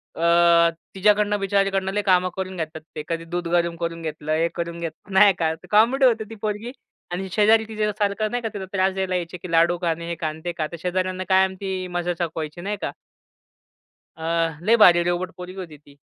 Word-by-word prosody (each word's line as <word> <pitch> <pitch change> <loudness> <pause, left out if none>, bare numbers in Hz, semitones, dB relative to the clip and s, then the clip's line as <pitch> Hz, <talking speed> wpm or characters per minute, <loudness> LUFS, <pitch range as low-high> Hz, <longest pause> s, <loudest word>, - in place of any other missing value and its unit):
अ, 170 0 +5 0.3
तिच्याकडनं 205 +1 +3
बिचारीकडनं 195 -1 +1
लय 205 - +1
काही 190 -3 +4
कामं 185 0 0
करून 190 0 -4
घेतात 160 -1 -5
ते. 150 - -4
कधी 165 0 -3
दूध 175 +1 -3
गरम 170 0 +1
करून 165 -1 -3
घेतलंय, 155 0 -2
हे 165 - +3
करून 170 0 -4
घेत 165 -1 -3 0.2
नाही 195 +1 +6
का. 160 -1 +1
तर 160 - -18
कॉमेडी 240 +6 +4
होती 230 -3 +3
ती 225 - -8
पोरगी 215 +3 -3 0.4
आणि 185 +2 -3
शेजारी 220 +2 +4
तिच्यासारखं 210 -1 -1
नाही 245 -1 -2
का, 225 - -1
तिला 195 -2 -5
त्रास 190 0 +2
द्यायला 190 -1 -2
यायचे 175 0 -3
की 175 0 -9
लाडू 170 +1 +4
खा 170 - 0
आणि 170 +1 -3
हे 170 - -3
खा 155 - 0
आणि 155 +1 -6
ते 175 - -1
खा. 155 -2 -1
तर 170 - -6
शेजाऱ्यांना 185 +1 -1
कायम 190 0 +3
ती 190 -2 -3
मजा 175 0 -1
चकवायची, 165 -1 -4
नाही 205 +3 -3
का. - - -2 1.3
अ, 165 -1 -1
लई 230 - +6
भारी 175 -2 +7
रोबोट 175 +1 -1
पोरगी 180 0 -8
होती 155 -4 -12
ती. 145 -1 -21
180 Hz, 210 wpm, -23 LUFS, 170-200 Hz, 1.3 s, भारी